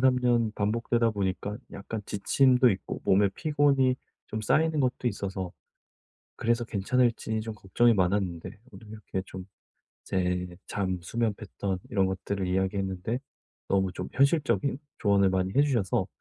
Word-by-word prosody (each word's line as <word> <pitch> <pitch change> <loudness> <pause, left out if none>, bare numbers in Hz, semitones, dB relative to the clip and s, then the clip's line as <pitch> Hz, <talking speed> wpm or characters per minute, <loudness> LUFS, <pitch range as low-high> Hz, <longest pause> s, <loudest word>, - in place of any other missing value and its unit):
3 130 0 +4
년 120 -3 +2
반복되다 115 +2 +1
보니까 100 0 -2 0.2
약간 105 +2 -5
지침도 125 +4 +4
있고 95 -2 -4
몸에 100 +1 +4
피곤이 145 -4 +3 0.3
좀 110 - -3
쌓이는 155 +6 +2
것도 125 -1 +1
있어서 95 -4 -4 0.8
그래서 120 +1 +1
괜찮을지 115 +1 0
좀 110 0 -5
걱정이 115 +4 +3
많았는데 90 -3 0 0.2
오늘 110 - -13
이렇게 105 -3 -5
좀 95 0 -8 0.6
제 90 -1 -1
잠 95 -3 -2
수면 115 +4 -1
패턴 100 -2 -4
이런 95 -2 +2
것들을 95 0 -2
이야기했는데 95 +3 -1 0.5
너무 95 -1 +1
좀 - - -5
현실적인 140 -1 +2 0.2
조언을 100 -2 +3
많이 95 0 0
해 140 - +7
주셔서 115 -9 +1
105 Hz, 305 characters per minute, -28 LUFS, 95-120 Hz, 0.8 s, 해